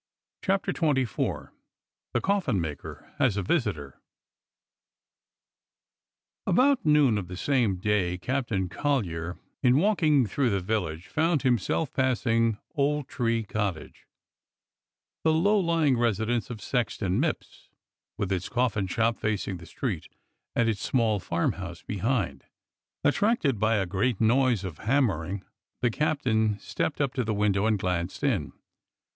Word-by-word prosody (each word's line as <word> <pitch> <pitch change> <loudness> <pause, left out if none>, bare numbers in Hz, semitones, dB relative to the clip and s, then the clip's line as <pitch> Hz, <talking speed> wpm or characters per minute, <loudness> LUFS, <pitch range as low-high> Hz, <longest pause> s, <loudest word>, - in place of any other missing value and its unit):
CHAPTER 195 -1 +1
XXIV 135 -8 -1 0.6
THE - - +1
COFFIN 190 - +1
MAKER 80 -4 -6
HAS 125 -8 +2
A 100 - 0
VISITOR 90 - -1 2.5
j4 185 - +2
BOUT 270 +3 +4
noon 150 -8 +4
of 90 - -6
the 90 0 -7
same 120 -5 +1
day 90 -2 0
Captain 115 -3 -1
Collyer, 90 - -1
/% - - -23 0.2
in 125 0 +4
walking 155 - +3
through 125 +5 0
the 100 -2 +1
village, 90 -4 -2
found 160 -2 +1
himself 130 +4 +1
X - - -43
JL - - -36
passing 115 -4 +2 0.2
Old 145 -2 0
Tree 115 -3 0
Cottage, 100 -6 -4 1.2
the 160 - +4
low 200 +7 +3
lying 165 -6 +2
resi 115 -3 +1
dence 120 -2 -1
of 115 -4 -7
Sexton 110 -5 -1
Mipps, 160 0 -4 0.5
with 100 -1 -2
its 95 -1 -1
coffin 115 -5 0
shop 115 +4 0
facing 105 -3 -2
the 85 -1 -12
street - - -4 0.5
and 120 - +2
its 110 -3 -1
small 115 -5 +1
farmhouse 85 0 -2
behind. 110 +1 -1 0.6
Attracted 145 - +2
by 110 +2 +3
a 100 -2 +1
great 100 +5 0
noise 120 -2 +3
of 90 -5 -6
hammering, 100 - 0 0.4
the 120 - +3
captain 110 -7 +1
stepped 145 +8 -3
up 140 -3 0
to 130 - 0
the 110 -1 -1
window 105 0 +2
and 110 -1 +2
glanced 90 -2 -2
in. - - 0
115 Hz, 140 wpm, -27 LUFS, 95-140 Hz, 2.5 s, BOUT